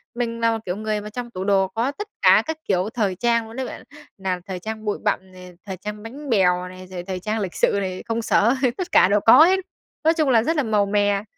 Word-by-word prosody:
mình 230 Hz, -1 st, -3 dB
là 230 Hz, 0 st, +2 dB
một 225 Hz, -, -2 dB
kiểu 180 Hz, -, -2 dB
người 215 Hz, -1 st, -2 dB
mà 210 Hz, -, -8 dB
trong 240 Hz, +2 st, -6 dB
tủ 185 Hz, -, -5 dB
đồ 195 Hz, -1 st, +2 dB
có 230 Hz, +8 st, -2 dB
tất 415 Hz, +8 st, -7 dB
cả -, -, +6 dB
các 320 Hz, 0 st, -3 dB
kiểu 190 Hz, +1 st, +1 dB
thời 205 Hz, -7 st, 0 dB
trang 235 Hz, +2 st, +1 dB
luôn 225 Hz, -, -11 dB
đấy 265 Hz, -, -3 dB
bạn, -, -, -8 dB, 0.3 s
nào 185 Hz, -2 st, -2 dB
thời 185 Hz, -2 st, -5 dB
trang 220 Hz, +2 st, -6 dB
bụi 210 Hz, -, -1 dB
bặm 190 Hz, -3 st, -1 dB
này, 180 Hz, -1 st, -12 dB
thời 190 Hz, -2 st, -6 dB
trang 210 Hz, +3 st, -7 dB
bánh 275 Hz, +5 st, -9 dB
bèo 180 Hz, -4 st, +2 dB
này, 185 Hz, 0 st, -11 dB
rồi 180 Hz, -1 st, -7 dB
thời 185 Hz, 0 st, -5 dB
trang 215 Hz, +4 st, -2 dB
lịch 190 Hz, -4 st, -3 dB
sự -, -, +2 dB
này, 185 Hz, -1 st, -4 dB
công 230 Hz, 0 st, -1 dB
sở 230 Hz, +2 st, +3 dB, 0.2 s
tất 370 Hz, -1 st, -4 dB
cả -, -, +6 dB
đều 205 Hz, -, +3 dB
có 230 Hz, +7 st, +9 dB
hết, 380 Hz, +2 st, +3 dB, 0.4 s
nói 320 Hz, -, +4 dB
chung 310 Hz, -4 st, +1 dB
là 230 Hz, -3 st, +4 dB
rất 325 Hz, +5 st, 0 dB
là 290 Hz, -, +2 dB
màu 210 Hz, -3 st, +2 dB
mè. 205 Hz, 0 st, +1 dB
210 Hz, 265 wpm, -22 LUFS, 190-235 Hz, 0.4 s, có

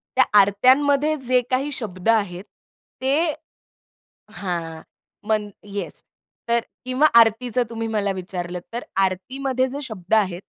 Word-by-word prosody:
त्या 260 Hz, -, +6 dB, 0.2 s
आरत्यांमध्ये 270 Hz, +9 st, +4 dB
जे 250 Hz, 0 st, +4 dB
काही 270 Hz, +3 st, 0 dB
शब्द 210 Hz, -6 st, -4 dB
आहेत, 200 Hz, -5 st, +1 dB, 0.6 s
ते 295 Hz, +5 st, +2 dB, 1.0 s
हां, 170 Hz, -4 st, -4 dB, 0.5 s
मन 215 Hz, -1 st, 0 dB
येस, 200 Hz, 0 st, -6 dB, 0.5 s
तर 235 Hz, 0 st, +4 dB, 0.3 s
किंवा 255 Hz, +4 st, +3 dB
आरतीचं 235 Hz, +2 st, +3 dB
तुम्ही 225 Hz, -1 st, -4 dB
मला 210 Hz, -3 st, 0 dB
विचारलत 180 Hz, -1 st, -5 dB
तर 240 Hz, -, -3 dB, 0.2 s
आरतीमध्ये 255 Hz, +8 st, -1 dB
जे 280 Hz, +3 st, -5 dB
शब्द 215 Hz, -6 st, -6 dB
आहेत 190 Hz, -5 st, +2 dB
225 Hz, 120 wpm, -22 LUFS, 190-260 Hz, 1.0 s, त्या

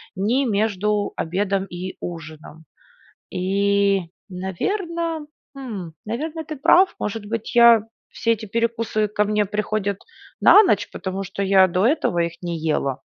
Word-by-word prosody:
ни 235 Hz, +8 st, +1 dB
между 210 Hz, -1 st, 0 dB
обедом 195 Hz, +3 st, -1 dB
и 180 Hz, +1 st, -7 dB
ужином. 160 Hz, -1 st, -9 dB, 0.6 s
И, 200 Hz, +1 st, +1 dB, 0.3 s
наверно, 325 Hz, -, -3 dB, 0.3 s
хм, 215 Hz, -11 st, -6 dB
наверно, 310 Hz, +8 st, -4 dB
ты 310 Hz, -, -6 dB
прав, 360 Hz, +7 st, +4 dB
может 210 Hz, 0 st, -4 dB
быть 225 Hz, +1 st, -4 dB
я, 235 Hz, -2 st, +7 dB, 0.3 s
все 230 Hz, -, -1 dB
эти 220 Hz, 0 st, -7 dB
перекусы 230 Hz, 0 st, 0 dB
ко 210 Hz, 0 st, +1 dB
мне 210 Hz, 0 st, +1 dB
приходят 210 Hz, -1 st, -2 dB, 0.4 s
на 425 Hz, -, +8 dB
ночь, 380 Hz, -, +1 dB
потому 190 Hz, +1 st, -4 dB
что 200 Hz, +1 st, -4 dB
я 190 Hz, -1 st, +5 dB
до 180 Hz, +3 st, +1 dB
этого 275 Hz, -, +1 dB
их 170 Hz, 0 st, 0 dB
не 175 Hz, -2 st, -3 dB
ела. 150 Hz, -4 st, -1 dB
205 Hz, 135 wpm, -22 LUFS, 185-230 Hz, 0.6 s, на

